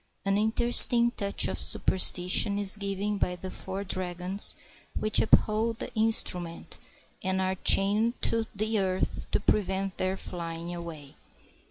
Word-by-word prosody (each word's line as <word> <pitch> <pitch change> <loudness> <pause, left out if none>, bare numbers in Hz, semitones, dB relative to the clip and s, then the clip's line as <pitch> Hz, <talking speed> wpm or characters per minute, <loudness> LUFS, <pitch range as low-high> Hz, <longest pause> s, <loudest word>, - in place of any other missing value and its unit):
An 195 0 0
interesting 235 +2 +5
touch 200 -4 -1
of - - -5
superstition 185 +2 +1
is 200 -1 +2
given 200 0 -4
by 180 - -2
the 185 +1 -9
four 190 +1 -7
dragons 185 +1 +1 0.4
which 215 0 +4
uphold 220 +1 +1
the - - -8
instrument 180 -7 -2 0.4
and 190 0 -2
are 190 0 -2
chained 210 +5 +2
to 225 -1 0
the 215 +1 -1
earth 185 -1 -3
to - - 0
prevent 195 -1 -2
their 185 +1 -3
flying 170 -2 -7
away. 165 -5 -10
195 Hz, 135 wpm, -26 LUFS, 185-215 Hz, 0.4 s, interesting